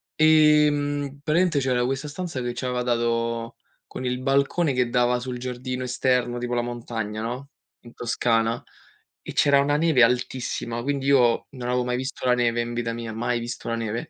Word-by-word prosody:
ehm, 150 -2 +3
praticamente 160 0 +2
c'era 125 -2 +1
questa 135 +3 -2
stanza 160 -1 -5
che 120 0 -2
c'aveva 125 -1 -2
dato 115 -1 -1 0.3
con 130 - -7
il 125 0 -2
balcone 140 +3 +1
che 125 -1 +1
dava 125 0 +2
sul 125 0 -5
giardino 125 +1 -4
esterno, 125 -1 0
tipo 120 0 -3
la 120 - +1
montagna, 115 -3 -4
no, 125 +4 -5 0.3
in 120 -1 -14
Toscana, 115 -1 0 0.6
e - - -7
c'era 140 -1 +4
una 145 +1 +1
neve 155 -5 +4
altissima, 120 -1 -1
quindi 140 -1 -2
io 125 -4 +3
non 125 -3 -5
avevo 125 0 +1
mai 125 0 -1
visto 130 0 -5
la 125 - +5
neve 120 -1 +1
in 120 0 -4
vita 115 -1 -2
mia, 115 -1 -5
mai 120 +2 -1
visto 120 0 -6
la 115 - 0
neve. 115 +7 -4
125 Hz, 180 wpm, -24 LUFS, 120-140 Hz, 0.6 s, la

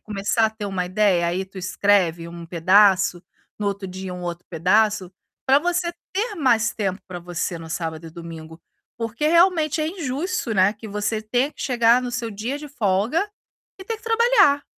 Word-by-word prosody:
começar 210 +2 0
a - - -3
ter 220 -1 -6
uma 190 -2 -2
ideia, 185 -2 +2
aí 180 +3 -1
tu 190 +1 -19
escreve 180 -3 +1
um 170 0 -9
pedaço, 185 +1 +4 0.4
no 210 - -2
outro 200 -1 -3
dia 185 0 -6
um 180 0 -7
outro 175 0 -5
pedaço, 185 +3 +2 0.4
pra 270 +1 +6
você 350 +2 0 0.2
ter 420 +3 -1
mais 240 - +2
tempo 195 -2 -2
pra 180 -1 -6
você 175 0 -4
no 160 -1 -10
sábado 165 -1 -4
e - - -9
domingo, 165 -1 -10 0.4
porque 230 +5 -2
realmente 335 -2 +3
é 310 - 0
injusto, 325 - -3
né, 190 +1 +4
que 220 +1 -11
você 210 +1 -2
tenha 245 +6 0
que - - -14
chegar 235 -1 +4
no 245 - -3
seu 240 -2 -3
dia 225 +7 -4
de 300 0 -9
folga 230 - 0 0.5
e - - -8
ter 455 +3 -3
que 440 - -22
trabalhar. 450 - +4
210 Hz, 185 wpm, -22 LUFS, 180-275 Hz, 0.5 s, pra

